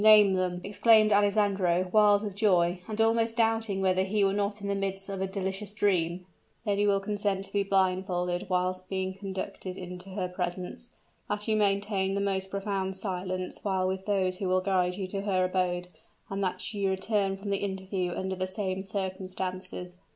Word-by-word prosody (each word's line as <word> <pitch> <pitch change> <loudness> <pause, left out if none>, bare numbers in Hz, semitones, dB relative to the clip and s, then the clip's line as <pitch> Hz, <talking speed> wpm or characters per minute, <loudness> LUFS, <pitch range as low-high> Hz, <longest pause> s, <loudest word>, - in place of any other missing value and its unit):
name 210 -2 +8
them!" 180 -1 0
exclaimed 215 +1 +5
Alessandro, 200 -3 +3
wild 210 -1 +5
with 205 -3 -4
joy, 180 -4 +3
and 215 0 -5
almost 225 +1 +2
doubting 225 -3 +2
whether 185 -1 +3
he 200 +2 +1
were 195 0 +3
not 205 +1 -1
in 200 - -5
the 200 - +1
midst 195 0 -2
of 195 -1 -4
a 190 - 0
delicious 195 +1 -4
dream. 180 -4 +1 0.4
"That 205 -2 +1
you 205 -1 +3
consent 200 -1 -1
to - - -18
be 200 - +2
blindfolded 185 -2 0
while 185 0 0
being 190 -1 -2
conducted 190 -1 -5
into 180 +1 -8
her 185 -1 -2
presence 180 +5 -4 0.4
that 210 +1 -2
you 220 - +2
maintain 200 -1 +1
the - - 0
most 190 -1 -1
profound 195 -1 -2
silence 185 -1 -3
while 190 -2 0
with 190 +1 -3
those 190 -3 +1
who 195 - -1
will 185 0 +3
guide 185 -2 +1
you 190 0 -3
to 195 +1 -3
her 190 -2 +1
abode 180 -1 0 0.4
and 195 0 -1
that 185 +4 -2
you 200 -2 0
return 195 0 0
from 200 +1 -5
the 200 - +2
interview 190 -2 -2
under 190 +1 -2
the 185 0 -2
same 190 0 -2
circumstances." 185 -2 -4
195 Hz, 180 wpm, -29 LUFS, 185-205 Hz, 0.4 s, name